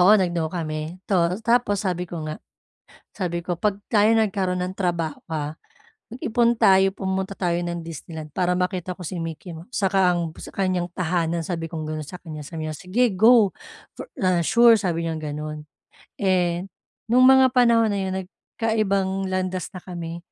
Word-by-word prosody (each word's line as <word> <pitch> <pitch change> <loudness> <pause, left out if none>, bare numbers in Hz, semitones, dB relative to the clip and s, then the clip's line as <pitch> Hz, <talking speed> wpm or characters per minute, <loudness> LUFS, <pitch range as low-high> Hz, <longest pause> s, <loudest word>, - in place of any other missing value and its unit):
oo, 200 +4 +7
nag-no 175 -4 0
kami. 155 0 -4
Tu 200 - -1 0.3
tapos 230 -4 +2
sabi 180 -2 -2
ko 165 -3 -5
nga, 155 0 -5 0.8
sabi 175 -4 -2
ko, 175 0 -3
"'Pag 205 +2 -1
tayo 215 0 +4
nagkaroon 195 -5 +1
ng 185 +1 -3
trabaho 170 -5 -1 0.2
ha, 150 0 -3 0.6
mag-ipon 235 0 +1
tayo, 190 0 +5
pumunta 190 0 -3
tayo 175 -3 -1
ng 170 0 -3
Disneyland 160 -1 -8
para 180 -1 +1
makita 180 0 -2
ko 180 - -24
si 185 - -5
Mickey 165 +1 -6
Mouse, 170 +9 -12
saka 195 -4 +2
ang 170 -2 -2
sa - - -9
kanyang 185 -2 -1
tahanan 170 -1 -1
sabi 165 -3 -4
kong 160 -2 -4
gano'n 155 0 -4
sa 180 +4 -9
kanya." 155 -4 -8
Sabi 155 +1 -6
niya, 155 - -4
"Sige 200 - +1
go, 220 0 +5 0.4
for, - - -9
ah, 180 -2 +2
sure," 235 +6 +6
sabi 170 -5 -1
niyang 160 -1 -4
gano'n. 150 0 -5 0.6
Eh, 180 -2 +1 0.4
no'ng 245 +3 +4
mga 265 0 +7
panahon 235 -2 +5
na 205 -1 -1
'yon, 190 0 -2
nagkaibang 195 -1 -2
landas 185 -1 -2
na 185 - -8
kami. 170 -2 -6
180 Hz, 170 wpm, -23 LUFS, 165-195 Hz, 0.8 s, oo